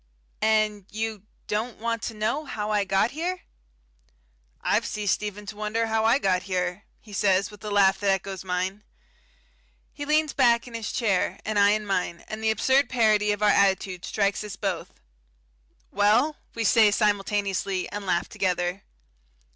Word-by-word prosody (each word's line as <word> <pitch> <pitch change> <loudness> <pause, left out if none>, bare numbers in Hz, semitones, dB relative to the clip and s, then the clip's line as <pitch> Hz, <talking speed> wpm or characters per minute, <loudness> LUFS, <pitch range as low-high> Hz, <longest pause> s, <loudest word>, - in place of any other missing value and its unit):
"And 215 -2 +1
you 215 -1 -4 0.2
don't 220 +3 -2
want 230 0 -2
to 225 - -5
know 220 +9 -1
how 215 -5 -4
I 205 -1 +1
got 195 +5 +2
here?" 345 +4 -3 1.2
"I've - - +1
ceased 210 -2 -1
even 210 0 -6
to 210 +1 -7
wonder 215 +2 -1
how 220 0 0
I 230 +3 +5
got 185 -7 +1
here," 180 0 -3
he 210 - -15
says, 195 0 +2
with 210 - -14
a 210 - -4
laugh 195 -1 +4
that 200 0 0
echoes 195 -1 -1
mine. 190 +2 -2 1.1
He 290 - -6
leans 305 0 +2
back 235 -3 +3
in 240 - -11
his 225 -2 -4
chair, 200 -6 0
and 215 -1 0
I 200 0 +6
in 215 0 -2
mine, 180 -3 -2
and 215 +1 -6
the 220 - +2
absurd 265 +6 +2
parody 215 -4 +3
of 205 0 -2
our 210 - +5
attitude 190 -2 +1
strikes 200 0 0
us 210 -2 -7
both. 190 - -4 0.9
"Well?" 220 +10 +3 0.2
we 230 - -1
say, 220 0 +5
simultaneously, 200 -2 0
and 205 0 -5
laugh 175 -2 +1
together. 180 0 -1
210 Hz, 165 wpm, -25 LUFS, 195-220 Hz, 1.2 s, I